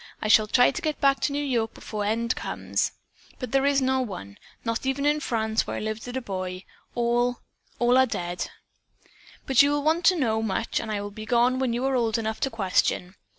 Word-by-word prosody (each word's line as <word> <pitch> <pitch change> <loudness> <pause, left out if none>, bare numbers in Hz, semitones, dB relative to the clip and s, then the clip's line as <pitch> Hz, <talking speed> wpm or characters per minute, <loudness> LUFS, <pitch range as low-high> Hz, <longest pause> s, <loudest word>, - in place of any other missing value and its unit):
I 215 - -2
shall 215 0 +6
try 245 +4 +5
to 350 - -5
get 310 -3 -2
back 275 -1 +3
to - - 0
New 290 +1 -1
York 235 -5 -1
before 210 -1 -5
the - - +1
end 230 +2 0
comes, - - -2 0.4
but 255 -4 -6
there 275 0 +3
is 280 -1 +3
no 260 0 +2
one, 180 - -7 0.3
not 230 0 -1
even 270 +1 -1
in 295 +1 +3
France, 220 -5 -1
where - - -3
I - - -2
lived 215 +2 -4
as 245 - -6
a - - -2
boy. 185 -3 -5 0.3
All 240 +1 +1 0.4
all 245 +2 +4
are 260 - +5
dead. 175 -5 -3 1.0
"'But 265 -1 +5
you 285 - +4
will 290 0 0
want 320 +3 +2
to 370 - +6
know 225 -8 +1
much 220 0 -1
and 220 - -5
I 205 -1 -2
will 205 0 -6
be 215 +1 -9
gone 245 +2 +3
when 260 -2 0
you 240 +3 -1
are 270 - +1
old 230 -3 +1
enough 220 -1 -3
to 270 - 0
question. 190 -4 0
240 Hz, 230 wpm, -26 LUFS, 215-265 Hz, 1.0 s, shall